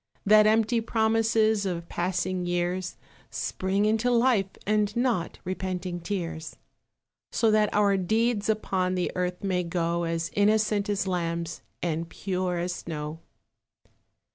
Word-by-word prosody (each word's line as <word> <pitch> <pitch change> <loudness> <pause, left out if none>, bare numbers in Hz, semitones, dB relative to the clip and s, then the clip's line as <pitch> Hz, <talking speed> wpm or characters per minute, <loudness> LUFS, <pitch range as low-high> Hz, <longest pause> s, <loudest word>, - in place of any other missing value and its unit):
That 215 +1 +7
empty 225 +2 +3
promises 220 -1 +2
Of 170 -3 -3
passing 180 0 -1
years 175 +1 -1 0.3
Spring 190 - -1
into 220 +3 +2
life, 235 -5 +3 0.2
and 210 0 +1
not 235 -8 0
Repenting 185 -1 -3
tears. 170 -3 -4 0.8
So 225 -2 +2
that 215 -1 +3
our 200 -1 +3
deeds 220 +3 +1
upon 190 -4 0
The 180 - -1
earth 180 0 -2
may 185 -2 +1
go, 170 0 -1
As 165 0 -2
innocent 210 0 +2
as 205 -1 0
lambs, 170 -2 -2 0.2
And 165 -1 -2
pure 185 -1 -2
as 175 +1 -2
snow. 155 -2 -5
185 Hz, 125 wpm, -27 LUFS, 175-215 Hz, 0.8 s, That